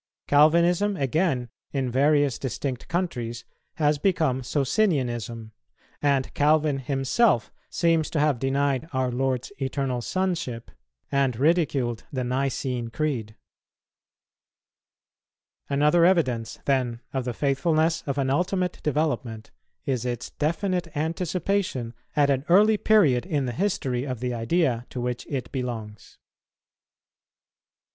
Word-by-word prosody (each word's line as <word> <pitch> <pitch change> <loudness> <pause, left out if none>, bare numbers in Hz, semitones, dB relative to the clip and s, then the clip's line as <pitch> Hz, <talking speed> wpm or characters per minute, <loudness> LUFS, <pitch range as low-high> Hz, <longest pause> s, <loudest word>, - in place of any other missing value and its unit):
Calvinism, 170 +7 +4
again, 135 -2 0 0.3
in 135 -3 -1
various 145 +1 +3
distinct 130 0 -4
countries, 120 -10 -3 0.3
has 150 -1 +2
become 155 -8 +1
Socinianism, 125 - -1 0.5
and 140 -2 +1
Calvin 150 -1 +2
himself 135 - +1 0.2
seems 165 -2 +1
to 155 - -1
have 145 -4 +2
denied 140 +3 0
our 130 -1 0
Lord's 130 +2 -1
Eternal 135 -2 -1
Sonship 170 -8 -2 0.4
and 135 -3 +2
ridiculed 140 -6 +1
the 130 -2 -2
Nicene 125 -1 -1
Creed. 115 -6 -2 2.3
Another 150 +4 +3
evidence, 130 -11 +2
then, 125 -4 0
of 130 -1 -1
the 125 -1 -3
faithfulness 155 +3 +1
of 140 0 -2
an 135 -1 +1
ultimate 180 +4 0
development 145 -7 -2 0.3
is 130 -4 -1
its 120 -1 -4
definite 175 +3 -1
anticipation 165 -5 -1 0.2
at 145 -1 +4
an 135 -1 0
early 210 +4 +6
period 170 - +4
in 150 -7 -1
the 125 - -2
history 135 - -1
of 130 -4 -4
the 125 0 -2
idea 120 0 0
to 125 - -6
which 125 0 -3
it 135 -3 -4
belongs. 115 -6 -6
140 Hz, 115 wpm, -25 LUFS, 125-160 Hz, 2.3 s, early